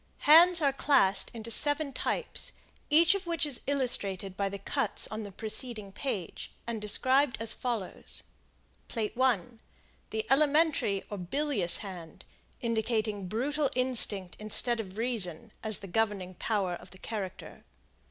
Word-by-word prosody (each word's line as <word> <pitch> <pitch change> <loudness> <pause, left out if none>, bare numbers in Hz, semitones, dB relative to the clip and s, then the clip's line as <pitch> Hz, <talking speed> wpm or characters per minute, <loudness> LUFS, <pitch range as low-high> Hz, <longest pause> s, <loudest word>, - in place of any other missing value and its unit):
Hands 335 +4 +8
are 280 -1 +3
classed 195 -9 +3
into 230 -1 -6
seven 290 +3 +3
types, - - -3 0.4
each 330 +4 +6
of 395 -2 -4
which 335 -1 0
is 285 -5 -2
illustrated 200 -9 0
by 200 0 -1
the 200 - -6
cuts 215 +3 0
on 215 0 -4
the 205 -2 -8
preceding 215 0 -3
page, 200 - -5
and 230 -2 -4
described 260 +5 +2
as 225 -1 +2
follows: 235 -7 -5 0.6
Plate 220 -3 -3
I 250 -7 +3 0.7
The 220 0 -3
Elementary 295 -8 +2
or 205 - -4
Bilious 205 - +2
Hand, 175 -4 -10 0.4
indicating 220 -3 -1
brutal 275 +8 -1
instinct 225 -8 +2
instead 225 +3 +1
of 195 -2 -7
reason 220 -4 +1
as 220 -2 +2
the 195 - -8
governing 195 -2 -1
power 190 -1 -1
of - - -9
the 185 - -12
character. 195 -2 -7
225 Hz, 140 wpm, -29 LUFS, 195-270 Hz, 0.7 s, Hands